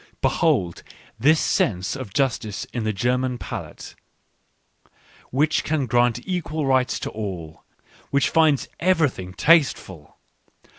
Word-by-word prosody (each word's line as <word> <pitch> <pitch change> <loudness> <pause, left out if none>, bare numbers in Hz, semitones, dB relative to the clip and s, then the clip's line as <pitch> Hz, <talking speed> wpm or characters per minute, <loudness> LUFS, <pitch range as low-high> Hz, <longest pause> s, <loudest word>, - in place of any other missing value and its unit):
Behold 85 -2 +1 0.4
this 155 +6 +4
sense 110 -6 0
of 130 -7 -7
justice 115 -5 -1
in 115 -3 -3
the 110 - +1
German 125 +4 0
palate, - - -8 1.4
which 145 +4 +1
can 155 -3 0
grant 120 0 +1
equal 165 -5 -2
rights 130 -1 +2
to - - -5
all, 90 -7 -6 0.2
— - - -28
which 140 0 +2
finds 155 -4 +3
everything 155 - +1
tasteful 110 - +1
125 Hz, 115 wpm, -23 LUFS, 105-150 Hz, 1.4 s, this